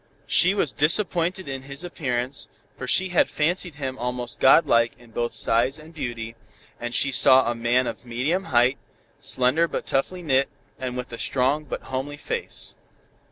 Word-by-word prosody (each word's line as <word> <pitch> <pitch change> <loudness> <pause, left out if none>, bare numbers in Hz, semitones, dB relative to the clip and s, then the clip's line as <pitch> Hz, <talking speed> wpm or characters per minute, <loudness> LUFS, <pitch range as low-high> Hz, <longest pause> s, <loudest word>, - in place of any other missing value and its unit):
She 185 +3 +3
was 165 -9 0
disappointed 175 +2 +2
in 135 -1 -5
his 140 +3 -4
appearance, 135 -6 -3 0.3
for 125 - -7
she 185 +8 +2
had 175 - +2
fancied 170 +1 -1
him 135 -2 -5
almost 125 0 -4
god 135 +5 +6
like 115 0 +3
in 120 -1 -19
both 120 +1 -2
size 120 +5 +2
and 155 +2 -14
beauty, 120 -6 -5 0.4
and 120 0 -4
she 135 +3 +1
saw 130 0 +6
a 120 - 0
man 120 +2 +1
of - - -5
medium 130 +11 -1
height, 125 0 +2 0.4
slender 135 +4 +2
but - - -4
toughly 175 +7 -2
knit, 135 -3 +2 0.3
and 125 -1 -4
with 125 -1 -6
a 115 - -6
strong, 135 +4 0
but - - -6
homely 135 +3 -4
face. 470 - -4
135 Hz, 170 wpm, -24 LUFS, 125-155 Hz, 0.4 s, god